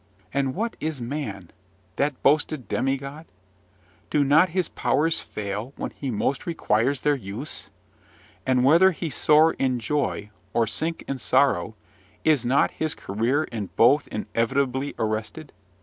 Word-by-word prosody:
And 135 -1 0
what 230 +2 -2
is 155 -3 -2
man 115 - -5 0.5
that 145 -1 -1
boasted 150 -2 +2
demigod? 140 +4 -2 0.8
Do 150 - +2
not 155 +6 +5
his 180 0 0
powers 160 +2 +1
fail 105 +5 -5
when - - -5
he 140 - -5
most 125 +6 -1
requires 130 -4 +1
their 150 - +3
use? 120 +3 -7 0.7
And 130 -1 +2
whether 170 +7 +6
he 165 -1 -4
soar 155 +3 +5
in 130 -2 +1
joy, 115 -4 -2 0.2
or 115 - +3
sink 160 +9 -2
in 135 -1 -3
sorrow, - - +2 0.5
is 145 -6 +3
not 135 +3 +3
his 155 -1 -3
career 115 +9 0
in 110 -8 -5
both 135 +6 +4
inevitably 130 +5 -1
arrested? 110 +8 -3
135 Hz, 135 wpm, -25 LUFS, 115-155 Hz, 0.8 s, whether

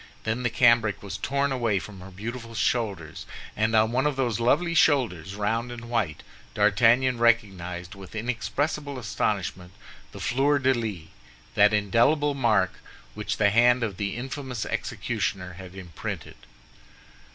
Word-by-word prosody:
Then 110 +3 -1
the 120 - +1
cambric 115 -4 +3
was 100 0 -6
torn 140 +1 0 0.3
from 95 +2 -10
her 90 +1 -10
beautiful 115 +4 -7
shoulders; 105 -8 -2 0.3
and 110 +1 +1
on 110 +1 +4
one 130 +4 +2
of 150 - -1
those 120 -5 0
lovely 170 +9 +2
shoulders, 115 - +2
round 115 +4 -1
and 120 0 -8
white, 100 -11 -1 0.3
D'Artagnan 115 +5 +4
recognized, 95 -7 0
with 100 +1 -12
inexpressible 140 +5 -2
astonishment, 95 -6 -2 0.4
the - - -10
fleur 140 +3 +2
de 135 -1 +3
lis—that 90 - -1
indelible 120 +9 +2
mark 110 -8 +1 0.3
which - - -3
the 100 -1 +3
hand 120 +2 +4
of 100 -5 -3
the 100 +1 -2
infamous 130 -1 -5
executioner 90 -2 -3
had 90 0 -11
imprinted. 90 -5 -7
115 Hz, 135 wpm, -26 LUFS, 100-125 Hz, 0.4 s, on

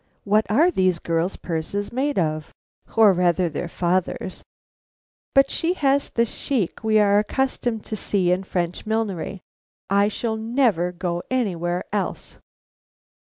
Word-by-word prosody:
What 215 +2 +2
are 310 - +4
these 185 - +2
girls' 165 +2 -1
purses 180 +5 -3
made 280 +4 0
of, 155 -3 -1 0.5
or 215 -3 +7
rather 180 0 +2
their 160 +3 -4
father's! 180 +2 -1 0.9
"But 275 0 +5
she 340 +1 0
has 280 -4 +1
the 235 - +1
chic 230 - -3
we 220 0 +3
are 205 -1 +5
accustomed 240 -1 -1
to 220 - -4
see 190 -3 0
in 185 +1 +1
French 175 0 -3
millinery. 200 -4 -2 0.5
I 200 +1 +4
shall 220 +1 -2
never 220 -6 +1
go 175 -1 -3
anywhere 180 -8 -1
else." 205 -2 -3
200 Hz, 135 wpm, -23 LUFS, 175-225 Hz, 0.9 s, or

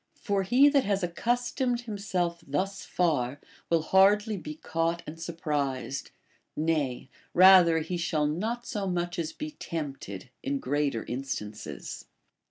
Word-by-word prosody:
For 200 -2 0
he 245 +9 +5
that 280 -2 +4
has 200 -1 0
accustomed 240 +6 0
himself 190 -6 -2
thus 190 +8 -2
far 145 -6 0 0.3
will 165 -2 +2
hardly 205 +5 +4
be 155 -5 -6
caught 165 +1 -1
and 160 +2 -8
surprised, 140 -6 -2 0.5
nay, 150 -6 0 0.3
rather 180 -2 +8
he 175 +3 -3
shall 160 -3 0
not 220 +11 -2
so 205 -5 -3
much 175 -1 -2
as 165 -1 -2
be 305 0 -6
tempted, 140 - -6
in 140 +1 -1
greater 140 -3 -1
instances. 120 -5 -5
170 Hz, 130 wpm, -28 LUFS, 145-200 Hz, 0.5 s, rather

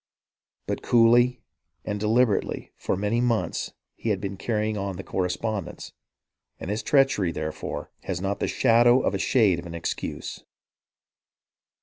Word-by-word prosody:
But - - -3
coolly 120 +1 +4 0.4
and 105 0 -3
deliberately 110 +1 +1
for - - -2
many 105 +4 0
months 120 -3 -1 0.2
he 115 - -4
had 100 -3 +1
been 100 0 -4
carrying 110 +1 -1
on 100 -2 -3
the 95 - -7
correspondence, 95 +1 -3 0.7
and 95 - -4
his 105 - -1
treachery, 135 - +3
therefore, 80 -1 -5
has 90 -2 -2
not 100 +2 -2
the - - 0
shadow 120 +2 +4
of - - 0
a 100 - -1
shade 100 -7 +3
of 85 - -8
an 85 - -7
excuse. 85 - -5
105 Hz, 140 wpm, -25 LUFS, 95-120 Hz, 0.7 s, coolly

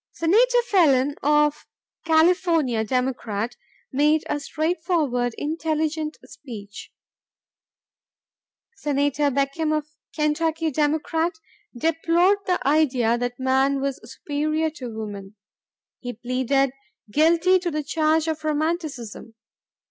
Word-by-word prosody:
Senator 480 +9 +3
Phelan 290 - +3
of 295 +1 +2 0.4
California, 320 -7 +3
Democrat, 240 -2 -2 0.4
made 300 +3 +2
a 295 - -1
straightforward, 310 -6 -1
intelligent 310 0 -2
speech. 205 -7 -10 1.9
Senator 290 -2 +1
Beckham 280 +3 -1
of 305 -1 0 0.3
Kentucky, 315 +1 0
Democrat, 315 +3 0 0.4
deplored 330 +7 +2
the 360 -1 +1
idea 260 -6 +3
that 245 +1 -3
man 265 +1 +2
was 275 +1 -2
superior 310 +2 -2
to 260 -6 -7
woman. 205 -3 -7 0.6
He 245 -1 -6
pleaded 255 +3 0 0.4
"guilty 335 - +4
to 355 -1 -2
the 305 -2 -3
charge 315 +1 +1
of 315 -1 -3
Romanticism." 300 -8 -3
300 Hz, 95 wpm, -23 LUFS, 260-320 Hz, 1.9 s, guilty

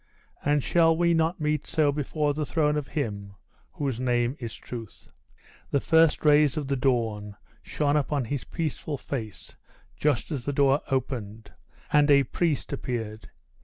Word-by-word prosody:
And 145 -1 +2
shall 165 -1 +3
we 170 0 +3
not 165 +2 +1
meet 150 -1 -1
so 150 -2 +2
before 145 +1 -1
the 150 +1 -2
throne 150 0 +1
of 150 -2 -2
Him 100 -9 -4 0.4
whose 135 -5 -2
name 120 0 +1
is 115 -3 -6
Truth?" 115 -4 -9 0.6
The 140 - +2
first 160 +1 +3
rays 150 -2 +5
of 145 -3 -2
the 140 - 0
dawn 115 -6 -1 0.3
shone 145 -1 0
upon 145 -2 0
his 140 +2 -3
peaceful 155 -2 -4
face 115 -7 -6 0.4
just 145 -3 0
as 140 -5 -3
the 145 - -2
door 140 +1 +3
opened, 115 -5 -3 0.4
and 150 0 +5
a 140 -1 +6
priest 155 +2 -1
appeared. 115 -5 -5
140 Hz, 155 wpm, -26 LUFS, 120-150 Hz, 0.6 s, a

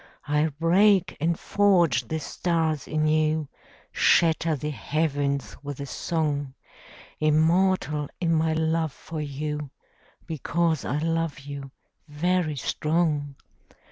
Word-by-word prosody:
I'll 150 +2 +2
break 190 +3 +4
and 165 +1 +1
forge 175 - +3
the 160 - -2
stars 160 -2 -1
anew, 155 0 +1 0.4
Shatter 165 -1 +3
the 150 +2 -4
heavens 145 -2 -1
with 145 -1 -6
a 140 - -4
song; 145 -2 -2 0.6
Immortal 155 0 +2
in 165 -2 +1
my 160 0 +2
love 160 0 0
for 160 -1 -7
you, 150 0 -4 0.6
Because 165 0 -1
I 140 - -1
love 165 -1 -1
you, 140 -1 -7 0.4
very 160 +1 0
strong. 150 0 -1
155 Hz, 110 wpm, -26 LUFS, 145-165 Hz, 0.6 s, break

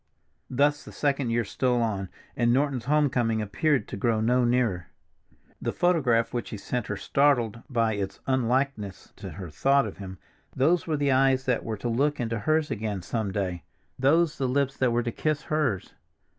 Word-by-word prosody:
Thus 145 +3 +2
the - - -11
second 140 -3 0
year 115 +1 +1
stole 125 +4 0
on, 100 -5 -1 0.3
and 120 -1 +2
Norton's 135 -1 +1
home 150 +1 +3
coming 120 -4 0
appeared 125 +5 0
to - - -6
grow 110 +2 +1
no 125 +3 +2
nearer. 120 -8 +1 0.7
The - - -1
photograph 135 -11 +2
which 120 - -3
he 110 - -5
sent 120 +3 -3
her 105 - -3
startled 120 -4 +1
by 115 -4 +1
its 100 -2 -4
unlikeness 130 -5 -1
to - - -7
her 90 -4 -8
thought 135 - +3
of - - -7
him; 95 -2 -8 0.4
those 160 +7 +2
were 155 -2 0
the 140 -1 +1
eyes 130 0 +3
that 125 -2 0
were 110 -2 -4
to 100 - -4
look 140 +6 +1
into 115 -2 -2
hers 155 +6 +1
again 105 -4 -3
some 110 0 -2
day, 95 -4 -2 0.4
those 160 +4 +3
the 135 - +1
lips 135 +1 0
that 130 - +2
were 120 +1 +1
to 120 - -2
kiss 150 +1 -1
hers. 135 - -1
125 Hz, 185 wpm, -26 LUFS, 110-140 Hz, 0.7 s, home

